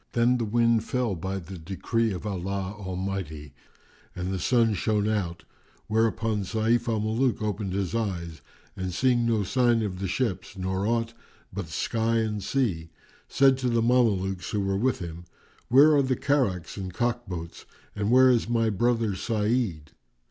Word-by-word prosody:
Then 120 +1 +3
the 115 - 0
wind 115 0 +2
fell 125 -2 -1
by 95 +3 -3
the 95 0 -8
decree 110 +6 -1
of 90 +1 -5
Allah 100 0 -3
Almighty 95 -7 -5 0.6
and 90 +1 -3
the 95 - -2
sun 115 +3 +3
shone 105 +1 0
out; 95 -6 -2 0.4
whereupon 110 -1 +1
Sayf 110 +5 0
al 110 -2 +1
Muluk 110 +4 0
opened 105 -2 -2
his 95 0 -2
eyes 85 -8 -3 0.3
and 95 -2 -3
seeing 120 +3 +2
no 110 -3 +2
sign 120 +2 +2
of 95 -3 -4
the 95 - -2
ships 100 -2 -2
nor 95 +2 -1
aught 115 0 0 0.4
but 95 -3 -4
sky 115 +7 -1
and 110 -2 -1
sea, 95 -11 -1 0.4
said 135 -1 +4
to 130 -1 0
the 115 -1 +2
Mamelukes 100 -7 +1
who 105 - -1
were 95 0 0
with 125 +6 +1
him, 85 -1 -7 0.4
"Where 145 +5 +7
are 145 - +5
the 130 -1 0
carracks 120 - 0
and 95 -2 -5
cock 120 +4 -1
boats 85 -2 -7 0.3
and 100 0 -1
where 130 +1 +6
is 120 -2 +1
my 115 -2 +2
brother 115 0 +1
Sa'id?" 105 - -1
105 Hz, 165 wpm, -26 LUFS, 95-120 Hz, 0.6 s, Where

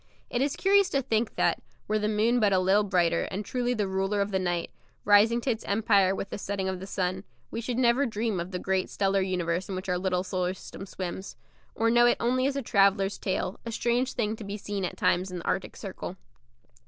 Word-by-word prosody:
It 245 - 0
is 280 +1 +1
curious 400 0 +4
to 275 -1 0
think 225 -2 0
that, - - +1 0.3
were 215 0 +1
the 210 - 0
moon 220 +3 +2
but 210 -3 +3
a 190 - +4
little 190 +3 +4
brighter 180 -4 +1
and 200 +2 -4
truly 245 -1 -1
the 210 -3 0
ruler 195 +2 0
of 200 +1 0
the 190 - +1
night, 175 -2 -2 0.3
rising 210 +3 +5
to 255 - 0
its 225 - -4
empire 200 -2 +3
with 195 - -5
the - - -4
setting 195 -1 -3
of 190 -1 -2
the 190 - -8
sun, 185 -1 -2 0.3
we 230 - -3
should 240 +1 -3
never 255 +2 +3
dream 220 -3 -1
of 170 +1 -4
the 185 - -3
great 190 0 -1
stellar 195 -1 +1
universe 180 -1 -1
in 190 - -3
which 185 +1 -5
our 180 0 +1
little 180 -1 0
solar 185 -1 -2
system 195 +1 -10
swims 190 +1 -6 0.4
or 230 0 +2
know 240 +1 +6
it 240 - +3
only 255 +2 +1
as 275 - -1
a 275 - -2
traveller's 195 -1 +2
tale, 190 0 -2
a 230 - -5
strange 240 +3 0
thing 220 -3 -1
to 220 - -8
be 200 +1 -5
seen 200 -2 -3
at - - -5
times 185 +2 +1
in 180 - -5
the 170 - -8
Arctic 190 - -2
Circle. 190 -1 -7
200 Hz, 235 wpm, -28 LUFS, 185-230 Hz, 0.4 s, know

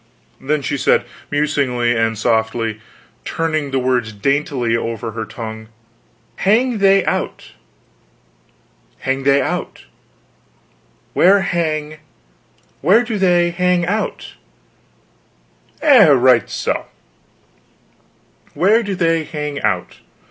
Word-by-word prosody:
Then 145 +1 -2
she 145 - -2
said - - +2 0.2
musingly, 140 -5 0
and 115 -1 0
softly, 110 0 -1 0.4
turning 155 -3 -2
the 135 - -1
words 125 -3 0
daintily 130 - -1
over 115 -1 -3
her 110 0 -5
tongue: 110 0 -8 0.7
"Hang 230 +3 +2
they 195 -1 +4
out - - -3 1.5
hang 135 0 -1
they 140 0 +4
out - - -5 1.3
where 195 +2 +5
hang 155 -4 -2 0.8
where 195 - +4
do 225 -4 -4
they 175 -2 +3
hang 180 0 +1
out; 210 +5 -3 1.5
eh, 265 - +7
right 125 -5 +4
so; - - -3 1.7
where 210 +6 +3
do 205 -3 -3
they 165 -2 +1
hang 150 -2 -5
out. - - -2
150 Hz, 100 wpm, -18 LUFS, 120-180 Hz, 1.7 s, eh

